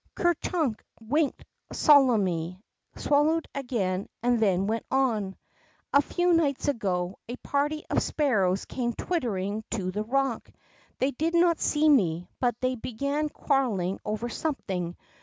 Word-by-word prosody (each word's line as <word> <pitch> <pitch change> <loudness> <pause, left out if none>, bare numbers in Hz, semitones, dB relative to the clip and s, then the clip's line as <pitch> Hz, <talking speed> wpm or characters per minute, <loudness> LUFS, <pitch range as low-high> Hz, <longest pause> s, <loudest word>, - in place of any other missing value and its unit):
'' - - -54
Ker 345 -1 +3
Chnnk 310 -8 -1 0.2
winked 285 +7 -1 0.3
solemnly, 195 - +3 0.4
swallowed 305 +3 +2
again, 205 -9 -2
then 215 -6 +2
went 225 +2 -1
on: 225 -8 0 0.6
A 280 - +7
few 350 +4 +1
nights 295 -5 +1
ago, 190 -9 -1
a 245 - -3
party 290 +4 -1
of - - +1
sparrows 195 -11 +1
came 240 -2 -2
twittering 215 - -2
to 190 -5 -2
the 210 +3 -2
rock; 265 +1 -1 0.5
they 265 +2 +1
did 320 +5 -1
not 340 -1 +4
see 305 +1 +2
me, 180 - +3
but 240 -3 0
they 255 0 +1
began 280 +6 -2
quarreling 220 -12 0
over 215 +3 -3
something. 190 - -3
245 Hz, 135 wpm, -27 LUFS, 195-290 Hz, 0.6 s, A